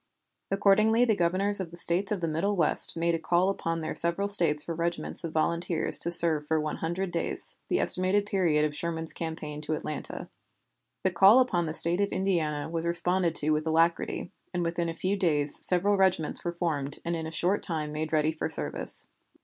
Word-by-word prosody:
Accordingly 215 +4 +2
the 225 - +1
Governors 190 +3 +1
of 185 -3 -5
the 170 - -13
States 180 +4 +3
of 200 -4 -2
the 165 - -2
Middle 165 +6 -2
West 165 -1 +3
made 170 +1 0
a 165 - -2
call 175 +4 +1
upon 165 -4 -4
their 155 - -4
several 170 +4 -1
States 170 -7 +3
for 170 - -5
regiments 170 +2 -3
of 165 - -5
volunteers 170 +1 -1
to 170 - -2
serve 160 -3 +7
for 160 0 0
one 150 0 -4
hundred 175 +3 -4
days, 170 - -2
the - - -1
estimated 185 +3 +2
period 170 -7 0
of 150 -1 -4
Sherman's 165 0 -2
campaign 155 -2 -6
to 155 +1 -4
Atlanta. 150 -1 -7 0.8
The 190 - +1
call 195 +7 +5
upon 180 -10 0
the 155 - -5
State 175 +3 +4
of 200 - -1
Indiana 160 -6 -2
was 165 +1 -4
responded 175 0 0
to 150 +1 +1
with 155 +1 -1
alacrity, 165 +2 -1 0.2
and 175 - -1
within 170 0 -3
a 165 - -6
few 190 +4 -2
days 150 -7 0
several 195 +3 +2
regiments 185 -5 0
were 175 - -4
formed 150 -5 -3
and 170 0 -2
in 160 -1 -5
a - - -8
short 180 +5 -1
time 155 -3 -1
made 155 +1 -5
ready 155 0 +1
for 155 - -5
service. - - +1
170 Hz, 200 wpm, -27 LUFS, 160-185 Hz, 0.8 s, serve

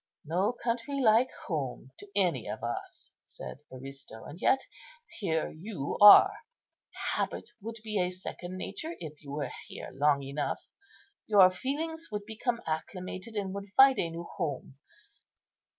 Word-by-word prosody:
"No 180 +8 +1
country 245 +4 -2
like 235 +1 +5 0.2
home 135 - -3
to 205 - -12
any 175 - +2
of - - -5
us," - - -5
said - - -9
Aristo; 130 -3 -8
"yet 265 +9 +3 0.6
here 160 -6 0
you 165 -4 -5
are. 205 0 +11 0.8
Habit - - -2
would 225 +3 -6
be 215 -2 -1
a 180 0 +2
second 185 0 -7
nature 320 - -5
if 155 -3 -8
you 140 - -8
were 145 -1 -3 0.2
here - - -8
long 140 +1 +3
enough; 140 +2 -2 0.7
your 195 -4 +7
feelings 320 - -3
would 205 -1 -3
become 230 +2 -2
acclimated, 185 +6 -4
and 195 -2 -2
would 200 0 -6
find 270 0 +8
a 170 - +1
new 165 +1 -6
home. 140 -4 -5
185 Hz, 140 wpm, -30 LUFS, 150-225 Hz, 0.8 s, are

